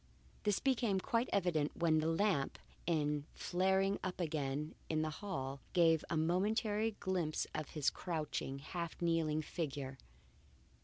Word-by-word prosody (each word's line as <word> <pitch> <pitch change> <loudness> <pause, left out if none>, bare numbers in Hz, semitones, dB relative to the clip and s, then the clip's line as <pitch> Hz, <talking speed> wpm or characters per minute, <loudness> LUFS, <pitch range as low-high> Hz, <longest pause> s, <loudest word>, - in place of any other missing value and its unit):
This 205 -2 +3
became 235 -7 +2
quite 230 +5 +1
evident 170 -6 +1
when 160 -2 +4
the 155 - +1
lamp, 165 -4 +2 0.3
in 150 -3 +1
flaring 190 +2 +2
up 185 -2 -3
again 150 -2 -1 0.2
in 155 -1 +1
the 155 - -1
hall, 140 -9 -3
gave 165 -3 +5
a 165 - 0
momentary 210 +6 +1
glimpse, 180 -5 0
of 155 - -3
his 150 -3 +2
crouching, 155 -5 -3
half 170 +4 -5
kneeling 165 -2 +1
figure. 140 -5 -4
165 Hz, 135 wpm, -37 LUFS, 150-190 Hz, 0.3 s, gave